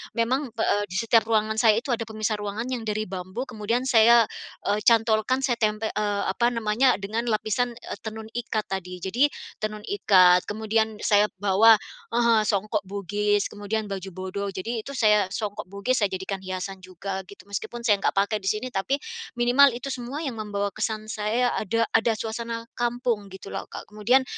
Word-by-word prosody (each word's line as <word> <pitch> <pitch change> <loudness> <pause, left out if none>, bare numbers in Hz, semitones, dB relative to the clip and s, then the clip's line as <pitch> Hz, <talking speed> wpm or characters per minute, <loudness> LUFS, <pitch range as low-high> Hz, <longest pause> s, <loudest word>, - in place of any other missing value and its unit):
memang, 255 +5 +1
pe 225 - 0
eee, 205 - +2
di 185 - -8
setiap 230 +1 +3
ruangan 220 0 +1
saya 220 -2 +5
itu 260 - -3
ada 230 -2 -1
pemisah 215 -1 -2
ruangan 205 +2 -3
yang 245 -3 -3
dari 215 0 -1
bambu 185 +5 -5
kemudian 230 0 -2
saya, 235 -2 +6 0.4
eee, 205 - +1
cantolkan 225 +3 +3
saya 240 -3 0
tempe 215 0 0
eee, 205 -1 -1
apa 235 +4 +1
namanya, 230 +3 +2
dengan 225 +4 -2
lapisan, 230 +2 0
eee, - - -8
tenun 220 0 -6
ikat 225 -3 -2
tadi. 180 -1 -5
Jadi 240 +10 +3 0.3
tenun 215 -1 -4
ikat 185 - +5
kemudian 220 0 0
saya 205 0 +4
bawa 205 +3 +6 0.4
heeh, 235 -2 +4
songkok 210 +1 0
Bugis 205 +1 0
kemudian 205 0 -3
baju 195 0 -4
bodo, 190 +1 -4
jadi 225 +4 -3
itu 280 - -6
saya 210 -5 +4
songkok 210 +1 -4
Bugis 200 +7 -1
saya 205 - +3
jadikan 190 +1 -4
hiasan 190 0 -5
juga 185 +1 -6
gitu 200 - -13
meskipun 235 +4 -5
saya 205 -3 +3
nggak - - 0
pakai 200 +2 +2
di 190 - -7
sini 215 +5 0
tapi 195 +6 0 0.4
minimal 245 +1 +5
itu 275 +2 -5
semua 260 +5 -5
yang 250 -7 -4
membawa 205 -1 -2
kesan 215 +1 -3
saya 230 +3 0
ada 230 +3 0
ada 225 +1 +3
suasana 230 +1 -4 0.2
kampung 240 -3 -1
gitu 190 +1 -10
loh, - - -5
Kak. - - -8
Kemudian 240 +6 +3
215 Hz, 180 wpm, -25 LUFS, 200-235 Hz, 0.4 s, saya